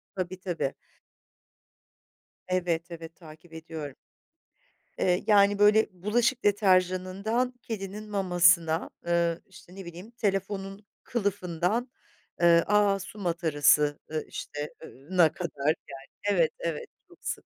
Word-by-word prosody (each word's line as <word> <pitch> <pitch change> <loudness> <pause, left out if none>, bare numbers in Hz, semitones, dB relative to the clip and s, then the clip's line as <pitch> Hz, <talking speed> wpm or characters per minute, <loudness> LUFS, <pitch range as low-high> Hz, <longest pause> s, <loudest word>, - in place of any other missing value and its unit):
Tabii 185 0 -4
tabii. 175 -7 -2 1.7
Evet, 175 -2 -1
evet 165 -1 -9
takip 160 0 -15
ediyorum. 160 -3 -7 1.0
Eee, 180 0 +2
yani, 205 -1 +5
böyle 210 +1 +5
bulaşık 225 +7 0
deterjanından 195 +4 +2
kedinin 210 -1 -6
mamasına, 175 -4 +3 0.2
eee, 170 -1 +1
işte 180 -1 -16
ne 195 -2 -9
bileyim 175 +6 -10
telefonun 195 -2 -3 0.2
kılıfından, 200 +1 -1 0.5
eee, 170 -1 +6
aaa, 205 -1 +3
su 210 +2 -9
matarası, 150 -5 +2
eee 155 -1 -2
işte 145 0 -6
eee, - - -9 0.2
na 175 -4 +4
kadar, 150 -5 -5 0.2
yani, 135 0 -10 0.3
evet, 165 -2 +3
evet 165 -3 -3 0.2
çok - - -21
sık. - - -4
185 Hz, 115 wpm, -28 LUFS, 165-200 Hz, 1.7 s, eee